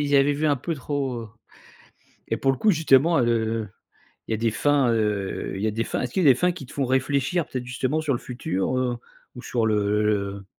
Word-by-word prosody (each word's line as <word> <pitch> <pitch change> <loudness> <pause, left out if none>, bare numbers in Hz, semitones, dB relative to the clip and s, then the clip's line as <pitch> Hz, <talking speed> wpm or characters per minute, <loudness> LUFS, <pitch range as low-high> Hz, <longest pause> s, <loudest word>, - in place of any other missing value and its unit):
y 145 - -3
ils 140 - +5
avaient 140 +1 +4
vu 150 +2 -1
un 145 - +3
peu 165 +5 -3
trop, 135 -3 -3
heu, 110 - -10 1.0
et - - 0
pour 135 - +2
le 130 - -5
coup 220 - +4
justement, 160 -1 +4
heu, 115 -2 0 0.6
il - - -2
y - - +2
a - - -2
des 115 0 +1
fins, 140 +2 +2
heu, 105 -3 -1
y 110 - 0
a - - +1
des 115 +2 -1
fins - - -3
est-ce 125 - -4
qu'il 190 - +1
y - - +3
des 135 - +8
fins 180 +6 +2
qui 140 -7 -9
te - - -13
font 140 - -1
réfléchir 140 +5 0
peut-être 130 -1 -5
justement 130 +4 -1
sur 155 -3 0
le - - -1
futur, 120 -2 -2
heu, 125 -1 0 0.4
ou 125 - -8
sur 115 -3 -1
le 105 0 +1
le? 100 -2 -1
125 Hz, 245 wpm, -24 LUFS, 110-145 Hz, 1.0 s, des